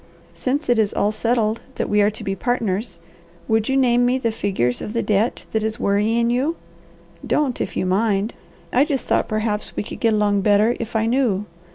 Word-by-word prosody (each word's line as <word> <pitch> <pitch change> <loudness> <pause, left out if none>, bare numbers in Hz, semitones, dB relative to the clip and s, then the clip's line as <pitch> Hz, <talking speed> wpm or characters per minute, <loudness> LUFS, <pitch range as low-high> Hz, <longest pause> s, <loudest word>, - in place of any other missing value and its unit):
Since 275 +4 -2
it 240 -2 +3
is 210 -2 +1
all 205 - +1
settled 225 0 0
that - - -2
we 210 0 +3
are 205 - +4
to 215 - -8
be 195 - -2
partners, 225 -1 -2 0.5
would 220 0 +1
you 265 - +2
name 245 -2 +3
me 250 +1 +2
the 235 -3 -1
figures 190 - -1
of 210 - -5
the 230 - 0
debt 215 +3 0
that 220 -1 0
is 220 0 -2
worrying 225 +4 +1
you? 270 +7 0 0.7
Don't, 280 -5 0
if - - -3
you - - 0
mind. 200 +3 +1 0.4
I 255 - +5
just 285 -3 -2
thought - - +1
perhaps 215 -1 -2
we - - -2
could - - -8
get 225 -2 +2
along 205 -1 +2
better 210 +4 +3
if 230 0 -6
I 220 0 +2
knew. 225 -5 +1
220 Hz, 205 wpm, -21 LUFS, 210-245 Hz, 0.7 s, I